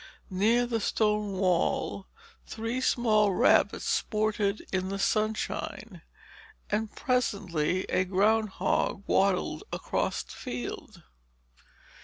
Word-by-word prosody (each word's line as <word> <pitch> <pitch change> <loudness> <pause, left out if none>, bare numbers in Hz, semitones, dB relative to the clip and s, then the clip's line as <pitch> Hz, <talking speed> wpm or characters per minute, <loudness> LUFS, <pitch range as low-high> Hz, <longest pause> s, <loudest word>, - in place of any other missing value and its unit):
Near 225 +6 +3
the 235 -2 -1
stone 210 -1 0
wall, 190 +4 0 0.4
three 230 +3 -3
small 215 -5 +3
rabbits - - +3
sported 215 -1 0
in 185 0 0
the 195 - -3
sunshine; 215 +2 -2 0.7
and 215 +1 0
presently 190 - 0
a 185 - +1
groundhog 200 +1 +1
waddled 195 -1 +1
across - - -2
the - - -14
field. 120 -1 -7
210 Hz, 95 wpm, -28 LUFS, 190-220 Hz, 0.7 s, Near